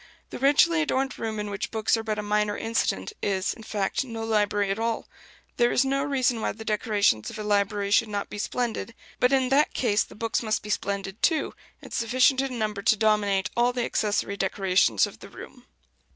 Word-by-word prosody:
The - - -6
richly 305 +5 +4
adorned 270 -3 -1
room 220 -1 -3
in 210 0 -4
which 200 0 -3
books 220 0 +1
are 225 - -2
but 215 -1 -3
a 210 - -3
minor 210 0 0
incident 230 - -1
is, 195 -1 0
in 225 - -13
fact, 210 +1 -2
no 230 -3 -6
library 205 -2 +1
at 200 - -2
all. 230 0 -2 0.5
There 240 0 +3
is 260 - +3
no 275 +1 0
reason 255 -5 0
why - - -1
the 220 +1 -10
decorations 210 - +1
of - - -8
a 215 - -5
library 205 -1 0
should 220 +2 +4
not 205 -1 -3
be 205 - -8
splendid; 230 0 -3 0.2
but 250 - +3
in 260 -2 +2
that 285 +3 +2
case 215 -4 +2
the - - -15
books 225 +1 -1
must 215 -2 -1
be 210 - -5
splendid 200 0 -3
too, 320 -2 +1 0.3
and - - -11
sufficient 255 +3 +3
in 265 -2 -3
number 210 -2 -2
to 220 - +3
dominate 205 -3 +1
all 240 +1 +2
the 245 -1 -1
accessory 205 -1 -1
decorations 190 - +2
of - - -11
the - - -11
room. - - -12
220 Hz, 210 wpm, -26 LUFS, 205-245 Hz, 0.5 s, richly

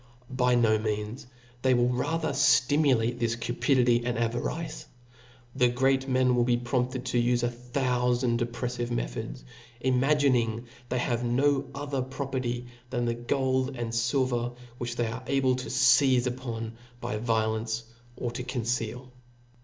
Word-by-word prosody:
By 125 -1 +2
no 110 -3 +3
means. 105 +3 -3 0.3
They 130 0 +4
will 120 0 +3
rather 160 +6 -1
ftimu 140 0 +4
late 120 +2 -1
this 115 -1 0
cupidity 120 0 +2
and 120 -1 -1
avarice. 120 +8 -3 0.7
The 125 -2 +4
great 135 +2 +1
men 130 -1 +3
Will 120 -1 +3
be 120 0 +2
prompted 125 +1 -1
to 120 -1 +1
ufe 120 0 +1
a 120 - +2
thoufand 125 -1 0
oppreffive 120 0 -3
me* - - 0
chodi^i - - -6 0.4
imagining 125 -3 +2 0.2
they 125 - 0
have 120 -1 0
no 135 +3 +2
other 140 -1 -2
property 130 -2 -3 0.2
than 120 -2 -1
the 120 - +1
gold 130 +2 0
and 120 -2 -3
filver 120 0 0 0.2
which 120 0 -3
they 120 - 0
are 115 +3 -4
able 135 -2 +2
ta 130 - -5
feize 130 -1 +4
upon 115 -3 -4 0.2
by 120 -2 -3
violence, 110 0 0 0.3
or 120 - -3
to 125 +2 -5
conceal. 125 0 -3
125 Hz, 145 wpm, -28 LUFS, 120-130 Hz, 0.7 s, They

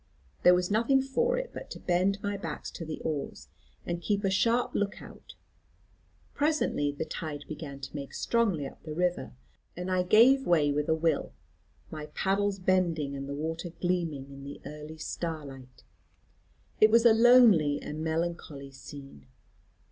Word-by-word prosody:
There 180 - +7
was 180 +2 -1
nothing 235 +6 +3
for 475 - 0
it - - -4
but - - -8
to - - -8
bend 190 +3 +1
my 205 0 -1
back 165 -6 -6
to - - -7
the 160 -1 -6
oars, 140 - -4 0.4
and 170 0 -3
keep 205 +3 0
a 195 - +1
sharp 230 +6 +2
look 205 0 -1
out. - - -13 1.0
Presently 290 - +1
the 145 +2 -4
flood 150 -4 -6
began 145 -3 -7
to 135 +2 -8
make 140 -2 -6
strongly 205 -11 +1
up - - -10
the 155 -1 -7
river, 180 +1 -1 0.4
and 180 +1 -4
I 185 0 +2
gave 240 +8 +5
way 155 -4 +3
with 150 +1 -1
a 160 - +4
will, 165 +1 0 0.6
my 155 -1 -6
paddles 200 +1 +1
bending 175 -6 +1
and 135 0 -6
the 140 - -3
water 165 +4 -4
gleaming 165 -7 -2
in 140 0 -10
the 140 +1 -8
early 150 +1 -8
starlight. 145 -6 -6 1.0
It 215 - +7
was 230 +2 +4
a 230 - +8
lonely 225 -11 +6
and 155 +1 -6
melancholy 160 -4 -3
scene. 135 - -12
170 Hz, 165 wpm, -29 LUFS, 145-200 Hz, 1.0 s, a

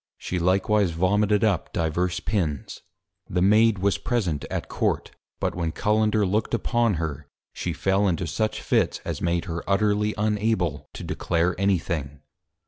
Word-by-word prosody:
_ - - -70
She 90 - -3
likewise 95 +3 +2
Vomited 100 +5 +2
up 100 -6 +1
diverse 85 +2 0
Pins. 85 - -2 0.5
The 90 - 0
Maid 110 +2 +5
was 100 +1 +1
Present 95 - -1
at - - -3
Court, - - -1 0.3
but - - -1
when 85 -2 -2
Cullender 105 +2 +2
look'd 105 +4 0
upon 120 -2 +1
her, 80 -4 -4 0.3
she - - -3
fell 95 +1 +1
into 90 0 0
such 105 +8 -2
Fits, - - +1
as - - -4
made 85 0 0
her 85 -1 -4
utterly 105 +1 +2
unable 105 -8 0
to - - -7
declare 85 +1 0
any 100 -1 +3
thing. 75 -5 -4
95 Hz, 155 wpm, -25 LUFS, 85-105 Hz, 0.5 s, Maid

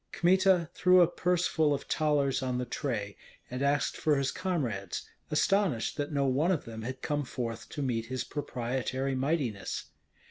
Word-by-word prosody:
Kmita 185 -1 +4
threw 180 0 +5
a 175 - +6
purse 180 +1 +1
full 155 -4 +2
of 140 - -6
thalers 145 -3 +1
on 130 -1 -1
the 125 - -1
tray, 115 -6 -3 0.3
and 125 +1 -3
asked 140 +1 +1
for 155 -2 +2
his 135 -1 0
comrades, 120 - -2 0.2
astonished 170 - +1
that 145 +1 -2
no 140 -2 +1
one 135 +6 +2
of 170 - -1
them 110 -1 -7
had 130 +3 -6
come 145 -1 0
forth 115 -3 -5
to 145 - -4
meet 115 -3 -1
his 130 +1 -2
proprietary 130 -1 -2
mightiness. 130 -6 -2
140 Hz, 170 wpm, -30 LUFS, 125-155 Hz, 0.3 s, a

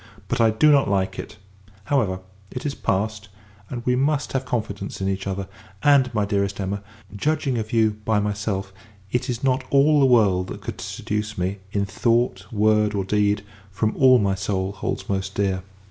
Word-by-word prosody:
But, - - +1
I 115 - +6
do 110 +8 +4
not 140 -6 +4
like 95 -1 0
it! - - -8 0.5
However, 100 -8 0 0.3
it 125 - -6
is 145 - -1
passed; 105 -1 -2 0.4
and, 120 -2 -6
we 125 - +3
must 145 +2 0
have 135 -1 -1
confidence 105 -6 -3
in 95 - -1
each 95 0 -2
other: 95 0 -3 0.4
and, 140 -3 +5
my 105 -3 0
dearest 100 -1 -1
Emma, 100 +1 -2 0.3
judging 140 +2 0
of 110 0 -5
you 110 -2 +3
by 110 -1 +2
myself, 100 -2 -2 0.4
it 125 +2 -1
is 120 +1 -3
not 130 -1 +2
all 145 +2 +5
the 135 - +5
world 100 -7 +4
that - - -7
could - - -6
seduce 105 0 -3
me, 95 +2 -2
in 100 -1 0
thought, 100 -1 0
word, 105 -1 +2
or 100 -2 -1
deed, 105 0 +1 0.3
from 105 +3 -1
all 130 -1 +6
my 100 -4 +1
soul 95 0 -2
holds 100 - -4
most 95 0 -2
dear. 95 -2 0
105 Hz, 185 wpm, -23 LUFS, 100-125 Hz, 0.5 s, I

